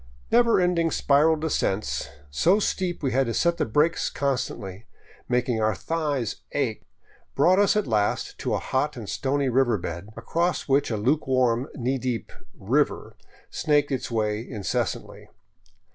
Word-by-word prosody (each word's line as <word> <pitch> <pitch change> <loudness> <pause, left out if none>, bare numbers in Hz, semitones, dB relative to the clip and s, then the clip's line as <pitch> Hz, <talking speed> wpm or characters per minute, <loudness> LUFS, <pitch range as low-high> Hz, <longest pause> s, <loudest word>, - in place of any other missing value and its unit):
Never 235 -2 +5
ending 175 -2 +2
spiral 150 +2 +3
descents, 145 -10 -1 0.2
so 175 - +3
steep 185 -5 -2
we 135 - +1
had 135 +1 +2
to 115 - -2
set 170 0 +2
the - - 0
brakes 150 +9 +2
con 140 -1 0
stantly, 100 -4 -6 0.4
making 125 -2 +1
our 110 -1 +2
thighs 145 - -2 0.2
ache, 130 -7 -2 0.5
brought 180 +7 +4
us 205 0 +4
at 210 - +1
last 105 -3 -1
to - - -1
a - - +1
hot 145 +2 -1
and 110 -4 -7
stony 140 +5 -1
river 125 -3 +2
bed 85 +1 -6
across 170 +9 -1
which 140 +1 +2
a 110 - -1
luke 130 +9 +1
warm, 130 -1 +2
knee 130 0 -1
deep 125 -4 -3 0.2
" - - -34
river - - 0 0.2
" - - -25
snaked 145 -2 +1
its 130 - -2
way 105 -2 0
incessantly. 110 -5 -4
135 Hz, 160 wpm, -25 LUFS, 115-160 Hz, 0.5 s, Never